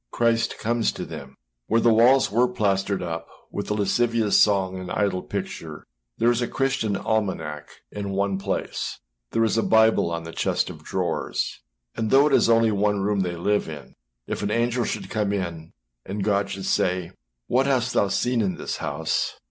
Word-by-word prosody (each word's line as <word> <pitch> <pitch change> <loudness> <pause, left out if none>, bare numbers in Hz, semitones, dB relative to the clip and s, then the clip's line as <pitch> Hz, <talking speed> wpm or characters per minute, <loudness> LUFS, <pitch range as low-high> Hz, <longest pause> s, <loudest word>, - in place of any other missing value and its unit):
Christ 115 -1 +1
comes 115 0 0
to - - -5
them. 70 0 -9 0.3
Where 115 - +3
the 115 0 +4
walls 125 +3 +5
were 120 +4 +3
plastered 100 -5 0
up 85 -1 -4 0.2
with 100 - -4
the 105 - -1
lascivious 110 +2 +1
song 95 -2 +2
and 90 -1 -7
idle 100 -3 0
picture, - - -6 0.3
there 120 - +4
is 120 0 0
a 120 - 0
Christian 135 -6 0
almanack 80 -10 -2 0.2
in 100 -1 -4
one 100 0 0
place, 100 0 -3 0.3
there 115 - +1
is 115 0 +2
a - - +3
Bible 110 -5 +4
on 85 -1 -3
the 85 - -7
chest - - 0
of - - -13
drawers; - - -2 0.3
and 110 -1 -1
though 135 +4 +6
it 150 - +2
is - - +4
only 115 -1 +4
one 105 0 +1
room 100 +1 0
they 90 -2 -1
live 100 +2 0
in, 75 -3 -9 0.3
if - - -4
an 100 - -1
angel 120 +2 +1
should - - -3
come 105 -2 0
in, 85 -5 -4 0.3
and 100 +1 -4
God 100 -1 +1
should 95 -1 -5
say, 90 -2 0 0.4
âWhat 130 +2 +2
hast 125 -3 +1
thou 100 - +3
seen 120 +4 +1
in 95 -3 0
that - - -4
house? 75 +3 -2
105 Hz, 190 wpm, -24 LUFS, 95-115 Hz, 0.4 s, though